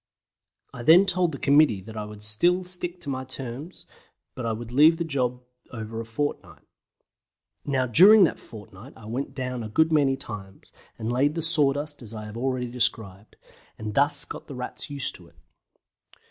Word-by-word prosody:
I 125 - -8
then 165 +9 +6
told 180 -2 +1
the 140 - -6
committee 140 -8 +4
that 110 +2 -11
I 105 -1 -4
would 105 0 -10
still 175 +13 +2
stick 180 0 -4
to 150 - -7
my 130 0 -4
terms, 130 +5 -7 0.5
but 125 -2 -5
I - - 0
would 115 +1 -6
leave 155 +6 +5
the 170 - -1
job 125 -5 -2 0.3
over 110 -2 -7
for - - -2
a - - -8
fortnight. 145 +6 -4 1.0
Now 135 -2 0
during 190 - +7
that 170 - +1
fortnight 105 +2 -13
I 115 - -14
went 125 +6 -5
down 125 -2 -4
a 110 - -6
good 160 +9 +2
many 140 -4 +2
times, 95 -5 -10 0.3
and 115 +1 -3
laid 145 +5 +1
the 165 - -2
sawdust 145 -2 +1
as 115 -1 -10
I 105 0 -7
have 105 +1 -9
already 125 0 -2
described, 110 -4 -3 0.4
and 105 -1 -6
thus 145 +2 +3
got - - -9
the 140 - -8
Rats 125 +3 -6
used 140 -2 0
to - - -17
it. - - -24
130 Hz, 190 wpm, -25 LUFS, 115-150 Hz, 1.0 s, during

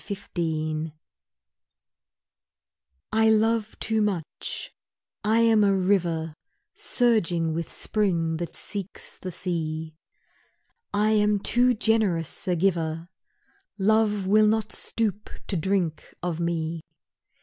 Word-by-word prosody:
DESERT 200 -1 -6
POOLS 155 -2 -1 2.2
I 220 0 +4
LOVE 220 0 +2
too 220 -1 +1
much; 190 -7 -3 0.5
I 220 +2 +3
am 225 -2 +5
a 200 -1 +4
river 175 -4 +1 0.4
Surging 175 -10 +1
with 165 0 -3
spring 170 -6 0
that 170 0 -5
seeks 200 -2 -4
the 185 - -5
sea, 160 -3 -3 1.0
I 210 +1 +2
am 210 -1 +3
too 245 +4 +3
generous 210 -9 +1
a 180 - +2
giver, 165 -2 0 0.7
Love 210 0 +2
will 215 +2 +5
not 215 0 +1
stoop 210 -2 -2 0.2
to 195 - -3
drink 175 -2 -1
of 175 -2 -2
me. 165 -1 -2
190 Hz, 105 wpm, -26 LUFS, 165-215 Hz, 2.2 s, am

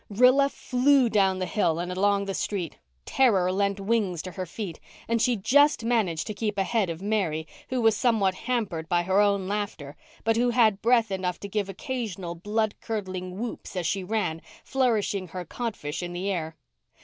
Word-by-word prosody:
Rilla 250 +6 +5
flew 260 -1 +3
down 195 -3 +3
the 185 - -1
hill 170 -6 +1
and 175 +1 -3
along 200 +2 +2
the 195 - -3
street. 185 -5 -3 0.3
Terror 195 -9 +3
lent 200 +1 0
wings 195 -5 0
to 185 - -6
her 185 0 -5
feet, 185 -2 -6 0.3
and 230 0 +1
she 245 0 +3
just 275 +4 +3
managed 210 -9 +1
to 215 - -4
keep 210 0 -3
ahead 195 0 +1
of 165 +2 -5
Mary, 185 -7 0 0.2
who 255 - -1
was 225 -1 +5
somewhat 205 -4 +2
hampered 185 -8 -3
by 175 -1 +2
her 190 +3 +3
own 200 -2 +2
laughter, 200 -9 -4 0.3
but 225 0 +2
who 245 +1 +3
had 225 -4 +3
breath 230 -2 +3
enough 185 -2 -2
to 200 - -5
give 200 0 -2
occasional 195 - -4
blood 210 +5 -1
curdling 185 -4 -4
whoops 230 -2 -6
as 180 -2 -2
she 195 +3 0
ran, 180 -5 -1 0.2
flourishing 220 -7 0
her 180 +2 -6
codfish 195 -8 -4
in 175 0 -5
the 190 +3 -2
air. 160 -3 -3
200 Hz, 185 wpm, -26 LUFS, 185-225 Hz, 0.3 s, Rilla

